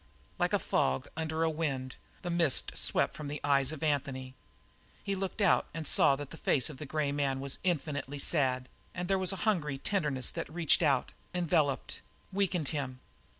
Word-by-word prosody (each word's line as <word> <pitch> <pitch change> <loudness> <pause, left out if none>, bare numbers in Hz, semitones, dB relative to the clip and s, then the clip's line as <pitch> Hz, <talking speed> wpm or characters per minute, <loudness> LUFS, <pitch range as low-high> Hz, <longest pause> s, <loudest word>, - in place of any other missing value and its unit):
Like - - +2
a - - +5
fog 65 0 0
under 160 0 -1
a 165 - +3
wind, 135 -5 -3 0.3
the 175 - -2
mist 170 -5 +3
swept - - +2
from 150 - -7
the 145 +1 -4
eyes 140 -1 +3
of 155 -1 -6
Anthony; 135 -3 -1 0.7
he 200 - -1
looked 195 +2 -3
out 200 - +4
and 165 -1 -4
saw 140 - +5
that 145 0 -7
the 165 - -9
face 145 0 +1
of 140 - -11
the 150 - -6
grey 150 -1 0
man 140 -2 0
was 135 0 -1
infinitely 145 -5 -2
sad, 130 -4 +3 0.3
and 180 -1 -3
there 195 0 +2
was 185 -1 +2
a - - -3
hungry 155 -10 +1
tenderness 145 -6 -1
that - - -5
reached 170 +1 +3
out, 140 -6 +2 0.2
enveloped, 160 -5 0 0.3
weakened 185 -6 +1
him. 130 -4 -4
150 Hz, 185 wpm, -31 LUFS, 135-170 Hz, 0.7 s, a